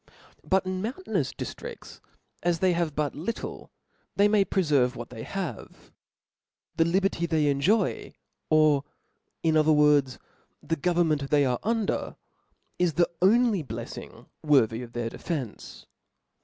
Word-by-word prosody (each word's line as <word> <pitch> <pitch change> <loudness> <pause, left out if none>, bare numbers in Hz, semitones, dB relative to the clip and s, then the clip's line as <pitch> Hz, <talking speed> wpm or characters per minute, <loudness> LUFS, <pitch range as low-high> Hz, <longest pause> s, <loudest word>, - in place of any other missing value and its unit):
But 190 0 +1
in 185 0 -3
mountainous 255 - -2
diftrifts, 480 -1 -8 0.4
as 175 -1 +1
they 185 +1 +2
have 170 -3 -1
but 150 -1 -1
little, 185 +10 -5 0.5
they 200 +1 +5
may 210 -1 +4
preferve 145 -10 +1
what 120 +1 -8
they 115 -2 -8
have. 175 - -6 0.8
Thef 165 +1 +2
liberty 190 -2 +1
they 160 -2 +1
enjoy, 145 +10 +1 0.4
or 155 -3 +4 0.6
in 160 -1 +2
other 155 0 +4
words, 150 -3 +4 0.4
the 160 +2 -2
govern 175 +2 +1
ment 140 -3 -1
they 145 -1 +4
are 125 -2 0
under, 225 -1 -1 0.6
is 175 -2 +2
the 175 +3 +2
only 215 -1 +4
bleffing 115 -2 -8 0.2
worthy 125 -7 +3
of 120 -1 -10
their 120 -1 -3
defence. 140 - -6
160 Hz, 135 wpm, -27 LUFS, 140-185 Hz, 0.8 s, they